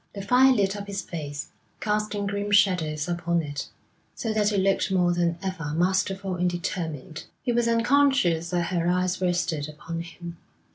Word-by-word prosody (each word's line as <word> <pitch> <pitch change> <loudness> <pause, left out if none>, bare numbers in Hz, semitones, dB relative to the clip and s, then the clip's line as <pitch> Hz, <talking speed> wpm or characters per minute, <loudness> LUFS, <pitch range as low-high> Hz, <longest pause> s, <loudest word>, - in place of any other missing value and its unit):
The 200 - -5
fire 255 +5 +5
lit 200 -5 +2
up 200 0 -6
his 200 -2 -4
face, 145 -4 -6 0.3
casting 210 -1 -1
grim 205 +1 -2
shadows 180 -7 +2
upon 170 -1 0
it, 145 -1 -5 0.5
so 225 -2 -2
that 210 -1 +2
it 205 - 0
looked 195 +1 +2
more 180 -2 +3
than 170 -1 0
ever 165 -6 -3
masterful 190 +2 0
and 180 0 +2
determined. 160 -4 -4 0.2
He 250 - 0
was 235 0 +2
unconscious 230 - +3
that 175 +1 -1
her 170 -1 +1
eyes 180 +1 +1
rested 170 -4 0
upon 165 +2 -6
him. 170 0 -9
180 Hz, 165 wpm, -26 LUFS, 170-205 Hz, 0.5 s, fire